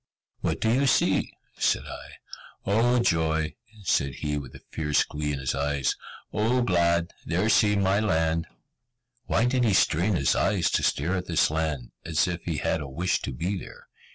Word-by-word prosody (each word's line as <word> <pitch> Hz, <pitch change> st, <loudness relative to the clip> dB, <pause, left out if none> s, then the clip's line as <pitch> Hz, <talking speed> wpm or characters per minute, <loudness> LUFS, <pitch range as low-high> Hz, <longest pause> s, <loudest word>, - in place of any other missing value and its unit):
"What -, -, -1 dB
do 110 Hz, -, +2 dB
you 135 Hz, +2 st, +2 dB
see?" -, -, +2 dB, 0.3 s
said -, -, +2 dB
I. -, -, -9 dB, 0.5 s
"Oh 115 Hz, +5 st, +3 dB
joy!" 80 Hz, -7 st, +1 dB, 0.3 s
said 70 Hz, -7 st, +1 dB
he, 75 Hz, +2 st, -2 dB
with 70 Hz, -4 st, -6 dB
a -, -, -12 dB
fierce 75 Hz, -2 st, +1 dB
glee 75 Hz, 0 st, -3 dB
in 70 Hz, -, -2 dB
his 65 Hz, -2 st, -2 dB
eyes, 70 Hz, -1 st, 0 dB, 0.4 s
"Oh 120 Hz, +4 st, +2 dB
glad! 85 Hz, -4 st, +2 dB
There 90 Hz, +6 st, 0 dB
see 105 Hz, -1 st, +4 dB
my 100 Hz, 0 st, +2 dB
land!" 80 Hz, -5 st, +1 dB, 0.8 s
Why 115 Hz, -, +2 dB
did 125 Hz, 0 st, +2 dB
he 110 Hz, -4 st, +3 dB
strain 90 Hz, +4 st, +2 dB
his 70 Hz, -5 st, +2 dB
eyes 90 Hz, -6 st, +1 dB
to -, -, +2 dB
stare 80 Hz, +7 st, 0 dB
at 90 Hz, -1 st, -3 dB
this 85 Hz, -3 st, +2 dB
land, 80 Hz, -6 st, -2 dB
as 85 Hz, +3 st, +1 dB
if 90 Hz, -1 st, -3 dB
he 80 Hz, -3 st, -2 dB
had 80 Hz, -, 0 dB
a 70 Hz, -, -5 dB
wish 85 Hz, +7 st, -1 dB
to -, -, -4 dB
be 90 Hz, +10 st, -2 dB
there? -, -, -12 dB
85 Hz, 180 wpm, -26 LUFS, 75-100 Hz, 0.8 s, see